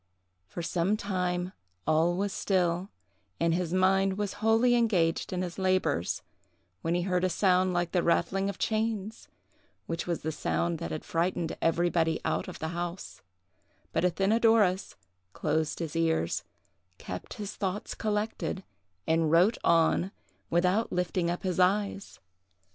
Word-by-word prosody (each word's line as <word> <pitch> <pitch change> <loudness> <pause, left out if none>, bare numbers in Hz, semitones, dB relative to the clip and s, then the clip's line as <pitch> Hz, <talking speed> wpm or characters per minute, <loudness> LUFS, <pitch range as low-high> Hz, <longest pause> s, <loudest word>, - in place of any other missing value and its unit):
For 175 - -6
some 180 +5 +1
time 180 -2 -2 0.3
all 160 +3 +3
was 200 +1 -1
still, 180 -1 0 0.5
and 165 0 +2
his 175 -1 -1
mind 190 +1 +3
was 205 -1 -2
wholly 225 +3 +4
engaged 195 -9 +2
in 185 0 -1
his 180 +1 -6
labors, 185 - +1 0.6
when 165 +7 0
he 175 - 0
heard 180 -1 0
a 185 - +3
sound 185 +1 +3
like 175 -1 0
the 180 - +2
rattling 190 +4 +1
of 200 - -5
chains—which 215 -5 -4
was 170 -2 -2
the 160 - -1
sound 170 +2 -1
that 170 - -4
had 155 - -5
frightened 170 0 -1
everybody 165 -1 +2
out 160 - -1
of - - -7
the 160 - -3
house; 175 +1 -5 0.7
but - - +1
Athenadorus 200 +1 +3 0.4
closed 155 0 -1
his 165 -2 -4
ears, 160 - 0 0.5
kept 90 0 -7
his 205 -1 -6
thoughts 200 +1 -3
collected, 210 -2 -2 0.4
and 160 -1 +2
wrote 180 +8 +4
on, 170 +3 +3 0.4
without 180 +6 +2
lifting 180 -1 0
up 175 - -3
his 185 -1 -1
eyes. 200 +2 +1
180 Hz, 140 wpm, -29 LUFS, 170-195 Hz, 0.7 s, wholly